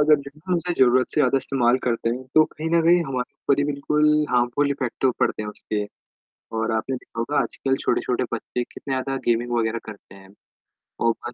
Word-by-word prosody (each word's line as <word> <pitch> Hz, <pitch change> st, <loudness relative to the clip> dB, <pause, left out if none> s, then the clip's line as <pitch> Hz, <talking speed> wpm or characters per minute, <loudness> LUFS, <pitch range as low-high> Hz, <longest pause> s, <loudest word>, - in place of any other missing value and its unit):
अगर 150 Hz, 0 st, +6 dB
जो 140 Hz, -, -7 dB, 0.2 s
हम 180 Hz, -, +2 dB
उसे 175 Hz, +1 st, -1 dB
ज़रूरत 125 Hz, 0 st, +4 dB
से 150 Hz, -, +1 dB
ज़्यादा 135 Hz, -, +3 dB
इस्तेमाल 125 Hz, -2 st, +2 dB
करते 115 Hz, -1 st, 0 dB
हैं 125 Hz, +2 st, -4 dB
तो 155 Hz, -, +7 dB
कहीं 155 Hz, +1 st, -5 dB
न 170 Hz, -1 st, +4 dB
कहीं 170 Hz, +1 st, +5 dB
हमारे 130 Hz, -3 st, -4 dB
ऊपर 140 Hz, -, 0 dB
ही 145 Hz, -, +2 dB
बिल्कुल 150 Hz, +1 st, +2 dB
हार्मफुल 125 Hz, +4 st, +2 dB
इफ़ेक्ट 130 Hz, -4 st, -2 dB
तो 130 Hz, -, +5 dB
पड़ते -, -, +1 dB
हैं 105 Hz, -, -5 dB
उसके। 105 Hz, 0 st, -4 dB, 0.7 s
और 110 Hz, 0 st, 0 dB
आपने 110 Hz, +4 st, -1 dB
देखा 115 Hz, -, -13 dB
होगा 145 Hz, +6 st, 0 dB
आजकल 135 Hz, -1 st, -1 dB
छोटे-छोटे 125 Hz, +1 st, 0 dB
बच्चे 120 Hz, +1 st, -3 dB
कितने 135 Hz, -, -8 dB
ज़्यादा 135 Hz, +1 st, -2 dB
गेमिंग 120 Hz, +1 st, +1 dB
वग़ैरह 115 Hz, 0 st, 0 dB
करते 105 Hz, -3 st, -11 dB
हैं। 95 Hz, 0 st, -15 dB, 0.7 s
वो 115 Hz, -, +4 dB, 0.2 s
बस 120 Hz, -, -7 dB
130 Hz, 205 wpm, -23 LUFS, 115-145 Hz, 0.7 s, तो